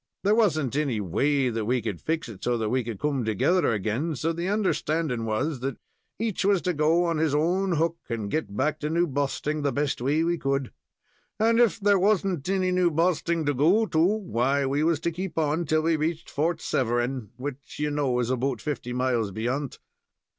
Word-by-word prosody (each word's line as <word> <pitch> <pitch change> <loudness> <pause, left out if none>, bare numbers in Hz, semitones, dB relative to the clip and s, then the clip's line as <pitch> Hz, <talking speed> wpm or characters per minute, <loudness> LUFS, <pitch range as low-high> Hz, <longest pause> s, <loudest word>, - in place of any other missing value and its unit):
There 205 - +4
wasn't 155 - +2
any 140 -7 0
way 135 - +1
that 115 -2 -2
we 125 +3 +1
could 110 -6 -4
fix 160 -1 -2
it 110 -5 -11
so 120 -1 +1
that 110 -2 -1
we 130 +2 +1
could 115 -4 -6
come 140 -4 0
together 115 - +2
again, 115 - -1
so 165 +5 -1
the 170 +2 -3
understanding 165 - 0
was 130 +6 -1
that 135 0 -3 0.4
each 220 -3 -1
was 200 -1 +3
to 180 - 0
go 160 +3 +3
on 165 -2 0
his 155 -2 +1
own 180 +5 +1
hook, 165 +1 0
and 110 -4 -3
get 105 -10 -2
back 150 +4 0
to 150 - -2
New 170 +2 +2
Bosting 145 +1 -2
the 140 -1 +1
best 140 -1 -1
way 145 +5 +1
we 170 0 0
could, 135 -2 -1 0.7
and 230 +2 +3
if 235 -2 +3
there 200 -1 +3
was 195 0 +3
n't 180 -4 -2
any 185 -1 +1
New 180 -1 +3
Bosting 165 0 +1
to 145 - +1
go 170 - +3
to, 160 - -1
why, 140 - +1
we 140 +3 0
was 165 -2 +2
to 170 - 0
keep 175 0 -5
on 160 +2 +1
till 155 +1 +1
we 165 0 +2
reached 160 +2 -3
Fort 160 +3 0
Severn, 120 -1 -1
which, 140 +1 -7
you 150 0 -1
know 140 -4 0
is 125 0 0
about 130 -1 -1
fifty 125 -5 -4
miles 125 -4 0
beyant. 125 +7 -3
150 Hz, 205 wpm, -26 LUFS, 125-170 Hz, 0.7 s, There